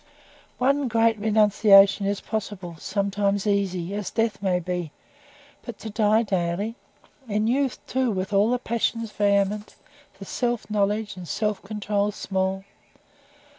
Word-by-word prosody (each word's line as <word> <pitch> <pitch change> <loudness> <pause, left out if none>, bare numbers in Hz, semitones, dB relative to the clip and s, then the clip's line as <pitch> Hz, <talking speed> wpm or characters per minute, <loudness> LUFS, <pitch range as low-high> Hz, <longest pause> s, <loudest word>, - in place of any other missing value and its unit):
One 275 +2 +2
great 225 -1 +2
renunciation 205 -2 +5
is 200 0 -1
possible, 195 -5 -5
sometimes 200 0 -1
easy, 195 -3 0
as 205 -2 -3
death 225 -3 -1
may 185 -2 +1
be; 175 -2 -4 0.7
but 240 -4 -8
to 220 - -7
"die 215 +1 +3
daily?" 190 +2 -1 0.5
In 210 +1 0
youth, 265 +3 +1
too, 260 -1 0
with 190 -1 -3
all 200 +3 +4
the 250 - +2
passions 230 -2 -2
vehement, 205 0 0 0.4
the 195 - -9
self 240 +2 -2
knowledge 205 0 0
and 180 -2 -8
self 210 +1 -1
control 205 0 -1
small? 190 -1 -2
205 Hz, 135 wpm, -24 LUFS, 195-220 Hz, 0.7 s, renunciation